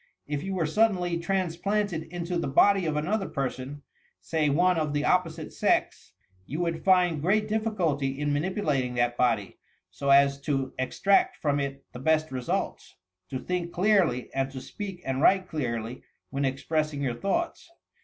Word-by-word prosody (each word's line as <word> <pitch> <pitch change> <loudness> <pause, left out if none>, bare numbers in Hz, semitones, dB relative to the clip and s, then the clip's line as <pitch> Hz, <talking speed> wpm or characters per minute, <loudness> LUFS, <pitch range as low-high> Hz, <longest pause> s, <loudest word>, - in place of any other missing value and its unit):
If 145 -1 -3
you 190 +1 -3
were 170 -3 +1
suddenly 180 -1 +1
transplanted 185 0 -1
into 175 0 -2
the - - -2
body 190 +6 +4
of 155 - -1
aiiolker 190 +7 -1
per 135 -3 -1
son 135 +3 -8 0.4
(say 155 -2 0
one 175 +4 +3
of 150 -2 -1
the 145 0 0
opposite 180 -3 0
sex), - - 0 0.3
you 150 - -4
would 170 -2 -2
find 180 -5 +3
great 210 +6 +2
difficulty 175 -12 -1
in 145 0 0
manipulating 145 -6 0
that 120 0 +1
body, 115 -5 0 0.3
so 140 - -3
as 140 0 +5
to 135 -2 -1
extract 195 +9 +2
from 145 -2 0
it 140 0 -4
the 125 - -7
best 155 +2 +1
results 125 -2 -3 0.2
— 90 0 -55
to 130 - -3
think 175 +4 -3
clearly 180 - +2
and 135 0 0
to 135 -1 -7
speak 190 +6 -7
and 135 0 -1
write 190 +2 +4
clearly, 120 -6 -3 0.3
when 140 0 -1
expressing 145 +2 -1
your 125 -3 0
thoughts. 330 - -2
155 Hz, 165 wpm, -27 LUFS, 135-185 Hz, 0.4 s, as